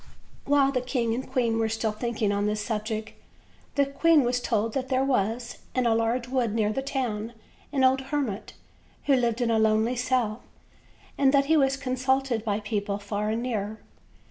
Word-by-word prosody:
While 280 -1 +4
the 255 -2 0
king 245 -3 -1
and 255 +2 -5
queen 235 -4 +1
were 225 -1 +1
still 220 0 -1
thinking 215 -1 -1
on 205 +1 0
this 210 0 -1
subject, 215 0 -3 0.6
the 280 - +4
queen 295 +2 +4
was 245 0 0
told 225 -2 0
that 260 -1 -2
there 260 0 +2
was, 235 -2 -1 0.2
in 255 -1 +1
a 230 - +4
large 230 +2 0
wood 245 -4 0
near 215 -1 +1
the 270 - -1
town, 240 -5 -3 0.4
an 270 -2 +1
old 260 +1 +4
hermit, 270 -9 -2 0.5
who 280 - +4
lived 240 -1 0
in 235 -1 +1
a 225 - +3
lonely 220 +2 +2
cell; 245 -3 0 0.8
and 275 -1 +5
that 275 0 +4
he 320 +3 +3
was 275 -2 +3
consulted 260 -2 0
by 210 -1 -1
people 205 -1 -2
far 205 +1 -3
and 225 +2 -1
near. 220 -3 -3
235 Hz, 185 wpm, -26 LUFS, 215-265 Hz, 0.8 s, and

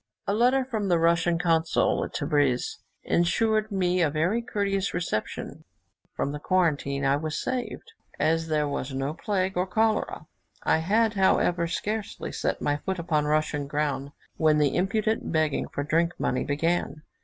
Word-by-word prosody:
A 200 - 0
letter 250 +4 +3
from 220 -6 -2
the 175 -2 +3
Russian 170 +1 +2
consul 165 -1 +2
at - - -7
Tebris 145 -4 0 0.2
ensured 215 +5 +1
me 180 -2 +1
a 160 - +3
very 170 +10 0
courteous 200 -5 -1
reception; 175 -11 -3 0.5
from 140 - -1
the 150 - -5
quarantine 145 -6 +1
I 135 +1 +3
was 155 +1 -3
saved, 245 -4 -4 0.3
as 160 +2 +1
there 150 -2 +1
was 135 -1 -4
no 135 +2 -2
plague 190 +2 -1
or 180 +1 0
cholera. 220 +3 0 0.4
I - - +3
had, 215 +7 +2
however, 180 -3 +2
scarcely 210 +4 -3
set - - -2
my 145 0 +1
foot 190 +5 -3
upon 155 -3 0
Russian 150 -1 0
ground, 145 -1 -1 0.3
when 155 -1 +4
the 145 -2 +2
impudent 215 +4 0
begging 155 -3 +1
for 145 - -4
drink 165 +3 0
money 130 - 0
began. 155 +1 -1
170 Hz, 155 wpm, -26 LUFS, 150-195 Hz, 0.5 s, when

